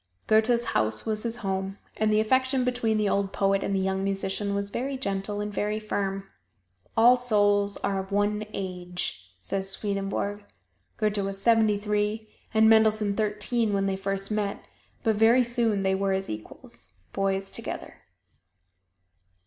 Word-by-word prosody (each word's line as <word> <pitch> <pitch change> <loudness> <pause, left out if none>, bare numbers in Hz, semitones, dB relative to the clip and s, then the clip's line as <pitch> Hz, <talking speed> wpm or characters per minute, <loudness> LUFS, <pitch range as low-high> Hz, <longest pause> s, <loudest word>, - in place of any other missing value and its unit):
Goethe's 225 +2 +3
house 110 0 +1
was 215 -1 -1
his 235 +1 -2
home, 190 0 -2 0.2
and 215 0 +1
the 215 - +4
affection 260 +3 +2
between 245 -3 +1
the 210 -1 +1
old 195 -1 0
poet 195 0 +1
and 195 - -1
the - - +1
young 190 0 0
musician 195 +1 -1
was 200 0 -2
very 265 +4 -2
gentle 200 -3 -2
and 210 0 -4
very 210 +1 -1
firm. 195 -2 -3 0.7
"All 240 +3 +7
souls 205 -4 +2
are 195 -1 0
of 190 +1 -6
one 205 +1 +1
age," 180 - -5
says 195 - -2
Swedenborg. 200 +1 -2 0.5
Goethe 210 -2 0
was 195 0 -3
seventy 220 -1 +4
three 210 +1 -1 0.2
and 220 0 +5
Mendelssohn 215 -2 +4
thirteen 215 +1 0
when 195 0 +1
they 195 -1 0
first 195 +1 -3
met, 210 -1 -2 0.4
but 220 -3 +2
very 230 +4 +5
soon 235 -4 +1
they 190 0 +2
were 195 0 +1
as 190 0 -1
equals 105 -3 -8 0.2
boys 195 0 -1
together. - - -7
205 Hz, 155 wpm, -27 LUFS, 195-220 Hz, 0.7 s, All